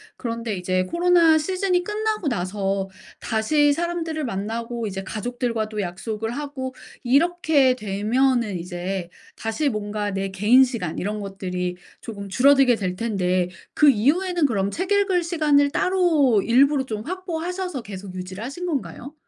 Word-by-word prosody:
그런데 230 -3 -4
이제 185 0 0
코로나 340 - +4
시즌이 365 +2 0
끝나고 425 -4 -1
나서 195 -1 -2 0.3
다시 290 +7 +2
사람들을 330 -1 -2
만나고 230 +2 -3
이제 195 -1 -5
가족들과도 220 0 -3
약속을 210 +5 -4
하고 265 -1 -5 0.3
이렇게 285 -1 +3
되면은 220 0 0
이제 180 +1 -4 0.3
다시 225 +7 -1
뭔가 210 -2 -3
내 195 0 -2
개인 210 +7 +5
시간 230 - -3
이런 210 +3 -3
것들이 180 -3 -4 0.2
조금 200 -3 -7
줄어들게 270 +3 +5
될 185 -4 -3
텐데 185 -5 0 0.2
그 300 - +6
이후에는 320 - +2
그럼 200 -6 0
책 370 +2 -3
읽을 390 -3 +3
시간을 300 -4 +3
따로 320 - +3
일부러 270 +3 +4
좀 215 -3 -5
확보하셔서 360 - -4
계속 195 -2 -8
유지를 185 +3 -6
하신 280 +9 -5
건가요? 290 -2 -4
240 Hz, 320 characters per minute, -23 LUFS, 200-310 Hz, 0.3 s, 그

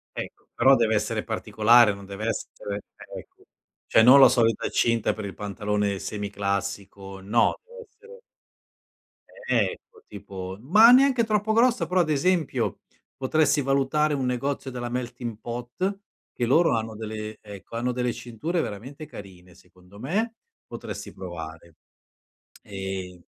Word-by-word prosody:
Ecco, - - -8
però 135 0 +5
dev'essere 110 -1 0
particolare, 110 +1 +4
non 100 0 -11
dev'essere 100 0 -5 0.3
ecco. - - -12 0.4
Cioè 110 - +5
non 130 +3 +8
la 135 - +9
solita 115 -4 +1
cinta 115 -2 +1
per 110 -2 -7
il 95 - -6
pantalone 105 0 -2
semiclassico, 100 -1 -4
no, 110 +4 +1
dev'essere 475 0 -14 1.3
Ecco, 445 -3 -2
tipo, 95 0 -8
ma 215 - +7
neanche 260 -2 +5
troppo 215 0 0
grossa, 240 +1 +3
però 180 0 +2
ad 155 - -1
esempio, 165 +1 0 0.4
potresti 145 +2 +2
valutare 140 +3 +1
un 135 -2 -1
negozio 130 +2 -2
della 120 -1 -5
Melting 120 -2 -5
Pot, 125 +12 -4 0.3
che 120 - -1
loro 160 +2 +4
hanno 110 -1 -3
delle 110 0 -6
ecco, 100 +2 -11
hanno 125 +2 -1
delle 125 -1 -1
cinture 150 +9 -4
veramente 130 +9 -7
carine 95 - -12
secondo 90 +2 -19
me, 215 - -2 0.3
potresti - - -8
provare. 85 -3 -9 0.9
Ehm 95 -3 -6
115 Hz, 125 wpm, -25 LUFS, 100-145 Hz, 1.3 s, la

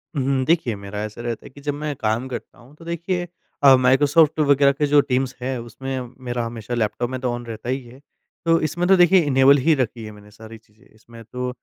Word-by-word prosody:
हुँ। 135 -1 0
देखिए 160 -8 +1
मेरा 100 +1 -7
ऐसा 110 +2 -7
रहता 120 -1 -5
है - - -10
कि 140 +2 -15
जब 145 0 -2
मैं 150 0 -4
काम 110 +2 -2
करता 125 - -8
हूँ 130 +5 -18
तो 165 - -16
देखिए 175 +1 -3 0.4
अ, 135 -1 +8
माइक्रोसॉफ्ट 145 +5 +3
वग़ैरह 140 -1 +4
के 150 +2 -1
जो 145 0 +5
टीम्स 130 -1 -1
है 130 0 -3
उसमें 130 +3 -6 0.3
मेरा 120 -1 -2
हमेशा 115 0 -6
लैपटॉप 120 +2 -1
में 130 - -4
तो 125 -2 -1
ऑन 120 0 -6
रहता 115 +1 -7
ही 130 +1 -1
है। 120 +3 -15 0.5
तो 165 0 +4
इसमें 170 +4 -1
तो 195 - +6
देखिए 175 +1 +5
इनेबल 135 0 +5
ही 160 +4 +3
रखी 120 -4 -3
है 110 - -8
मैंने 105 0 -16
सारी 110 +1 -12
चीज़ें। 110 +2 -27
इसमें 115 +1 -15
तो 125 +3 -5
130 Hz, 225 wpm, -21 LUFS, 115-145 Hz, 0.5 s, अ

